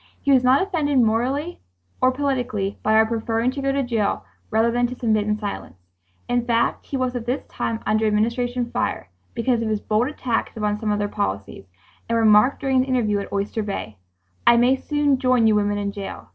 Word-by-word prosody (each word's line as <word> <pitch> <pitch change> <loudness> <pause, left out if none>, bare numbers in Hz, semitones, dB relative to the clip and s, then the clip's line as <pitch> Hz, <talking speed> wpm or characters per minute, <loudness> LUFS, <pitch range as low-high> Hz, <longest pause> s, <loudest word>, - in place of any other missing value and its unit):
He 280 - 0
was 260 -2 +5
not 260 +6 +4
offended, 310 -8 0
morally 255 +8 +1 0.4
or 255 - +4
politically, 250 -8 -2
by 215 +1 +2
our 220 0 +6
preferring 225 +2 -1
to 275 - -5
go 275 0 0
to 275 0 0
jail 230 -5 -1 0.2
rather 225 +2 +2
than 245 +1 +1
to 250 - -7
submit 215 -4 0
in 210 0 0
silence. 145 - -6 0.5
In 245 0 +1
fact, 235 -1 0
he 275 - -3
was 255 -1 -1
at 240 -1 -5
this 255 +3 -2
time 225 -1 -4
under 215 +1 +2
Administration 235 +3 0
fire, - - -2 0.3
because 235 0 +1
of 225 - -1
his 215 -1 0
bold 215 +4 0
attacks 250 -6 -3
upon 210 -1 -1
some 215 -1 -1
of 205 - +1
their 205 0 -1
policies, 100 - -4 0.4
and 230 - +1
remarked 220 +3 +4
during 265 -1 +1
an 255 - +4
interview 235 -6 +1
at 200 - -7
Oyster 200 +2 -2
Bay: 195 - -5 0.5
"I 235 - +7
may 245 +3 +4
soon 290 -1 0
join 255 -3 +3
you 220 - +5
women 205 0 +1
in 200 0 -2
jail. 200 -1 -8
230 Hz, 205 wpm, -22 LUFS, 210-255 Hz, 0.5 s, I